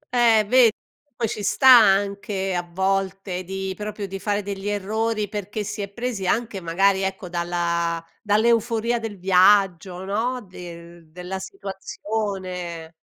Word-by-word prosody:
Eh, 230 -3 +5
ve 245 0 +6 0.4
poi 230 - -1
ci 210 - -5
sta 265 +6 +2
anche 200 -2 +2
a 175 - 0
volte 190 +1 -2
di 190 +1 -4
proprio 210 0 -5
di 195 0 -6
fare 205 +1 -1
degli 200 0 -5
errori 215 +2 -1
perché 205 +1 -4
si 210 +1 -5
è 200 - -3
presi 235 -4 -3
anche 215 -2 -1
magari 190 +3 +2
ecco 190 -1 -3
dalla 170 -1 -1 0.2
dall'euforia 230 +2 +2
del 225 -3 -6
viaggio 185 -1 +3
no, 230 +6 -1
del 170 -2 -11
della 180 +3 -6
situazione. 190 - -5
195 Hz, 135 wpm, -23 LUFS, 180-215 Hz, 0.4 s, ve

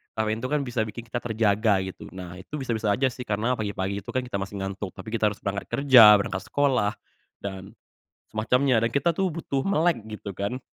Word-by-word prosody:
kafein 110 0 -1
tuh 130 - -3
kan 150 0 0
bisa 120 -2 -4
bikin 115 +2 -7
kita 120 +1 -4
terjaga 110 -3 +2
gitu. 95 - -8
Nah 90 0 -9
itu 150 - -8
bisa-bisa 115 -6 -2
aja 130 -1 +1
sih 125 0 -8
karena 110 +4 0
pagi-pagi 100 -1 -2
itu 100 - -17
kan 130 - +1
kita 110 -6 -4
masih 100 +1 -5
ngantuk, 95 0 -5
tapi 110 - -8
kita 110 -2 +2
harus 105 - -5
berangkat 100 -1 -3
kerja, 125 -7 +9
berangkat 95 -1 -2
sekolah 130 -8 +1 0.5
dan 95 -1 -7 0.5
semacamnya 125 +4 +2
dan 115 - -1
kita 140 +4 +2
tuh 190 +3 0
butuh 140 -5 -2
melek 170 - +1
gitu 105 -2 -7
kan. 105 +6 -3
110 Hz, 200 wpm, -26 LUFS, 100-130 Hz, 0.5 s, kerja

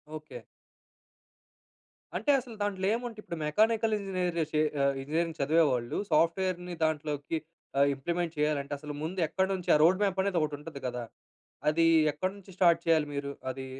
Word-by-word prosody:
Okay. 155 0 -8 1.8
అంటే, 290 - +2
అసలు 245 -3 -10
దాంట్లో 195 -2 -1
ఏముంట 235 -1 -4
ఇప్పుడు 170 - -6
మెకానికల్ 220 +7 +2
ఇంజనీర్స్ 185 -3 -2
జేసే 155 -1 +1 0.2
ఆహ్, 140 0 +3
ఇంజనీరింగ్ 160 +3 -1
చదివేవాళ్ళు 140 -5 +2
సాఫ్ట్‌వేర్‌‌ని 175 +3 +1
దాంట్లోకి 150 0 -1 0.4
ఆహ్, 140 0 +5
ఇంప్లిమెంట్ 170 +4 -2
చేయాలంటే, 150 -1 0
అసలు 150 0 -6
ముందు 180 +4 -3
ఎక్కడ 190 +5 0
నుంచి 185 -2 -4
ఆ - - +6
రోడ్ 185 +5 +4
మ్యాప్ 195 -1 +1
అనేది 195 -3 +1
ఒకటుంటది 150 -1 -4
గదా! 125 -1 -4 0.7
అది 165 +2 +3 0.3
ఎక్కడ 185 +5 -2
నుంచి 195 0 -15
స్టార్ట్ 170 -2 +5
చేయాలి 160 -2 +4
మీరు 140 0 -3 0.2
అది? 130 +1 -6
165 Hz, 150 wpm, -30 LUFS, 150-190 Hz, 1.8 s, ఆ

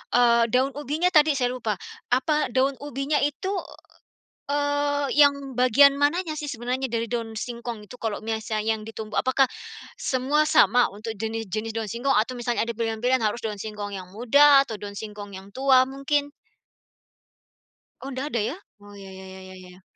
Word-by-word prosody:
eee, 235 -1 +5
daun 260 +4 +2
ubinya 295 +5 -1
tadi 305 -2 +5
saya 245 -2 0
lupa. 230 -4 -2 0.4
Apa 300 +4 +1
daun 265 +2 +1
ubinya 285 +1 -2
itu, 295 +7 -1 1.0
eee, 285 0 0
yang 280 -1 +3
bagian 255 +3 +5
mananya 320 +3 +1
sih 295 -1 -5
sebenarnya 250 +2 -3
dari 230 -1 -1
daun 225 -2 -3
singkong 235 -1 -6
itu? 250 +5 -13
Kalau 215 -1 -3
misalnya 220 -1 -2 0.2
yang - - -10
ditumbuk, 220 -1 -3
apakah 260 +1 +3 0.6
semua 290 - +1
sama 245 -6 +5
untuk 215 +3 -7
jenis-jenis 225 0 -4
daun 220 -3 -3
singkong 260 +4 0
atau 220 +4 +1
misalnya 240 -2 -1
ada 235 - -3
pilihan-pilihan 230 +3 0
harus 220 +2 -1
daun 210 -2 -4
singkong 210 -1 -6
yang 185 -2 -7
muda 275 +7 +5
atau 220 -5 -7
daun 200 -1 -8
singkong 205 -2 -8
yang 195 +1 -12
tua 260 0 +4
mungkin? 285 +2 -2 1.7
Oh, 270 - -6
nggak 260 +3 -3
ada 235 - +1
ya? 235 +8 -2 0.3
Oh, 205 0 -14
ya 195 -1 -11
ya 190 0 -10
ya 190 0 -11
ya - - -11
ya. 180 +1 -17
245 Hz, 170 wpm, -25 LUFS, 220-280 Hz, 1.7 s, eee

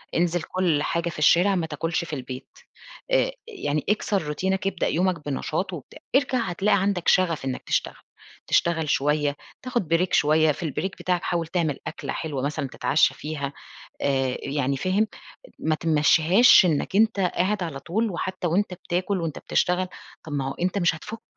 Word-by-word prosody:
انزل 175 0 +1
كُل 165 -3 0
حاجة 170 0 -1
في 155 - -8
الشارع 175 +6 +5
ما 175 -3 0
تاكُلش 165 +3 -2
في 160 - -8
البيت، 130 -1 -6 0.6
آآ - - +3 0.2
يعني 155 - -2
اكسر 210 -2 +1
روتينك، 190 +6 -1
ابدأ 190 -3 -1
يومك 175 -2 0
بنشاط 155 +6 -2
وبتاع. 155 -6 -9 0.2
ارجع 265 -2 +3
هتلاقي 200 -1 +1
عندك 195 -3 -1
شَغَف 170 -6 +3
إنّك 130 -1 -3
تشتغل. - - -1 0.5
تشتغل 165 -3 +1
شوية، 145 +1 +1 0.3
تاخُد 240 -8 -2
بريك 170 +3 +1
شوية، 155 +1 +4
في 150 - -6
البريك 165 +4 -3
بتاعك 180 -1 0
حاول 170 -2 -1
تعمل 165 -5 -1
أكلة 160 - -5
حلوة 150 -5 -3
مثلًا 140 -1 -2
تتعشّى 145 +3 +2
فيها. 145 -2 -5 0.5
آآ 135 -2 +1
يعني 140 -1 -1
فاهم؟ 190 +8 +1 0.5
ما 155 - +1
تمشّيهاش 165 +8 +5
إنّك 170 +3 0
أنت 220 -1 +3
قاعد 185 +2 +1
على 155 -5 -5
طول 215 +10 -1
وحتّى 185 0 -3
وأنت 185 +3 0
بتاكُل 185 +1 -2
وأنت 165 -3 -4
بتشتغل، 180 +1 0 0.4
طَب 155 - -7
ما 135 -2 -1
هو - - -4
أنت 185 +3 -1
مش 175 -4 +2
هتفُك، 215 +7 -8
170 Hz, 165 wpm, -25 LUFS, 150-190 Hz, 0.6 s, الشارع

